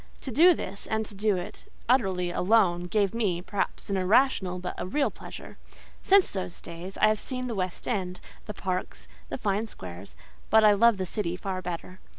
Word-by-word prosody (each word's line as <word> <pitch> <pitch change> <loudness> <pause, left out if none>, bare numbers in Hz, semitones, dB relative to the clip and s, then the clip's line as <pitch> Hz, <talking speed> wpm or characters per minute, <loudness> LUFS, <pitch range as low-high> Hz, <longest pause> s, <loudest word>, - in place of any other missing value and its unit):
To 265 - -5
do 340 +7 +6
this, 200 -5 -5
and 220 0 -1
to 210 - -8
do 205 0 +1
it 175 - -8 0.2
utterly 190 -8 +2
alone, 180 -2 +3
gave 200 0 +1
me, 205 -7 0
perhaps 195 +3 -3
an 195 - -1
irrational, 190 -1 +2
but 180 0 -5
a 175 - -3
real 285 +9 +1
pleasure. - - -10 0.4
Since 390 -1 +5
those 185 -3 -5
days, 175 +3 -8
I - - +4
have 215 0 +2
seen 255 -1 -3
the 245 - -3
West 185 -3 -3
End, 185 -6 -2 0.3
the 210 - -5
parks, 185 -1 -4 0.2
the - - -3
fine 210 -1 -1
squares; 90 - -10 0.3
but 220 0 +6
I 210 - +8
love 225 +1 +5
the 190 - -2
city 180 -2 -2
far 185 -1 -4
better. 180 +1 -6
195 Hz, 190 wpm, -27 LUFS, 180-220 Hz, 0.4 s, I